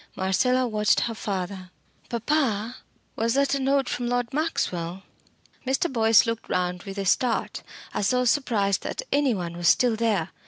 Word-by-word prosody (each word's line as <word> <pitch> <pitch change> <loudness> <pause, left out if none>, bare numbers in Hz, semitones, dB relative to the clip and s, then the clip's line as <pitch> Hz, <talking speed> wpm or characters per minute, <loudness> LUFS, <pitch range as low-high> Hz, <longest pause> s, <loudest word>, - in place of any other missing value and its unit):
Marcella 250 +7 +1
watched 210 -2 +2
her 230 - -1
father. 190 -3 -4 0.4
"Papa 235 -2 -1 0.4
was 230 +2 0
that 280 0 +2
a 280 - +1
note 270 0 +1
from 245 -1 -2
Lord 245 0 -1
Maxwell?" 185 - -2 0.6
Mr. 265 +4 0
Boyce 225 -2 +5
looked 230 -1 -4
round 180 0 -1
with 195 +1 -8
a 200 - -2
start, 235 +5 0 0.3
as 205 - 0
though 250 0 +1
surprised 225 -7 +1
that - - -4
any 280 -5 +2
one 170 -3 -5
was 175 0 -1
still 245 +3 +4
there. 215 -7 0
230 Hz, 160 wpm, -25 LUFS, 195-255 Hz, 0.6 s, Boyce